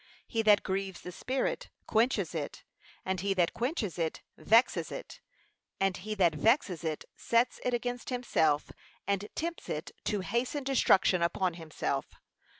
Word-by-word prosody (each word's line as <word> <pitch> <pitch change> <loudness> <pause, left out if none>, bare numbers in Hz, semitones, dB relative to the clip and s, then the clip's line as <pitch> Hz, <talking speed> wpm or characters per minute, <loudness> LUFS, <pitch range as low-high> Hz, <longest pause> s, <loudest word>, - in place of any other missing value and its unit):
He 225 - 0
that 210 -2 +5
grieves 190 -1 -2
the 180 - -7
Spirit, 265 - -2 0.2
quenches 220 -6 +2
it; 155 -4 -4 0.4
and 185 -1 -1
he 195 0 0
that 175 -2 +2
quenches 235 - -2
it, 160 -1 -2
vexes 230 +3 +3
it; - - -7 0.6
add 195 -2 +1
he 215 +3 -4
that 175 -5 +4
vexes 185 - +2
it, 155 -2 -3
sets 235 +1 +1
it 250 -1 +1
against 245 0 -3
himself, 160 - +1 0.3
and 200 +1 -1
tempts 335 +1 -4
it - - -3
to 205 -3 0
hasten 240 +8 -1
destruction 195 -9 +4
upon 175 +1 +1
himself. 155 -4 -3
200 Hz, 150 wpm, -31 LUFS, 175-240 Hz, 0.6 s, that